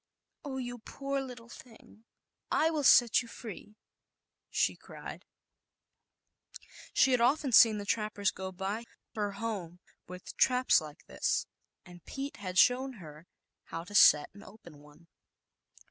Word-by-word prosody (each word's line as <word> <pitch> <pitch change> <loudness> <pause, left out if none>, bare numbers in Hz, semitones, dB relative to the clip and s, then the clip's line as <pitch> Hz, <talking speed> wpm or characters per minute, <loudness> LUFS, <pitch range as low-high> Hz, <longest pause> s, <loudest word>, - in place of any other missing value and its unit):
"Oh, 275 -3 -5
you 245 -1 -5
poor 275 +4 -4
ng, 235 -3 -12 0.5
I 320 +1 +2
will 305 -2 -2
set 240 -3 +6
you 240 - -11
free," 215 -2 -10 0.7
she - - 0
cried, - - -11 1.9
often 270 +3 +2
seen 225 -2 +7
the 205 - -6
trappers 210 -2 -1
go 190 0 -7
by 195 +4 -4
e 210 -4 -5 0.4
with 180 0 -10
traps 250 -7 +3
like 150 -1 -12
this, - - -1 0.4
and 175 -1 -14
Pete 275 +1 -6
had 185 -2 -6
shown 260 +4 +4
her 160 -5 -13 0.4
how 165 0 -6
to 180 - -13
set 150 -7 +6
and 200 - -14
open 175 -8 -15
one. 150 +3 -19
215 Hz, 125 wpm, -30 LUFS, 185-250 Hz, 1.9 s, seen